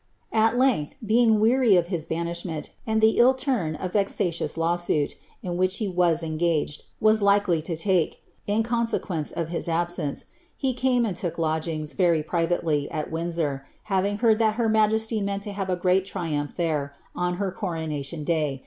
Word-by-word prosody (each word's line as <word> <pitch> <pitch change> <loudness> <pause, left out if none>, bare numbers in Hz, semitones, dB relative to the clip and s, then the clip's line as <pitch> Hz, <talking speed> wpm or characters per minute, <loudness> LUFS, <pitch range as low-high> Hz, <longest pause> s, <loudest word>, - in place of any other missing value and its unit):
At 225 +1 +3
length, 250 - +2
being 220 0 +4
weary 230 -1 +4
of 175 -2 +3
his 170 -5 -2
banishment, 170 -1 -4 0.2
and 220 0 +1
the 220 0 +4
ill 255 +2 +6
turn 235 - -1
a 185 - -2
vexatious 180 -4 -1
law 165 +1 +1
suit, 155 -4 0 0.3
in 180 - -3
ivhifh 185 +1 +2
he 215 - -1
was 175 -3 +2
engaged, 160 -2 -1
waa 215 0 +5
likely 200 -3 +3
lo 165 - -1
take, 175 0 +1 0.3
in 210 +2 +2
consequence 230 -9 -1
of 165 -1 -3
his 170 0 -2
absence, 165 -3 -2 0.3
he 265 -2 0
came 250 -1 +2
and 195 -6 -3
look 170 -2 -2
lodgings, 155 -1 -1
very 170 -5 +2
privately, 165 -3 0
at 155 -2 -4
Windsor, 160 -4 -2 0.3
having 200 +2 +1
heard 220 -1 +3
that 220 -2 +2
her 230 -1 +1
majesty 220 0 +2
meant 200 0 -2
to 205 - -4
have 195 -1 -4
a 180 - +2
great 180 +1 +2
triumph 150 -6 -3
there, 150 -5 -1 0.2
on 180 0 -1
her 195 0 -2
coronation 160 -5 -4
day. 150 -4 0
175 Hz, 175 wpm, -25 LUFS, 160-215 Hz, 0.3 s, ill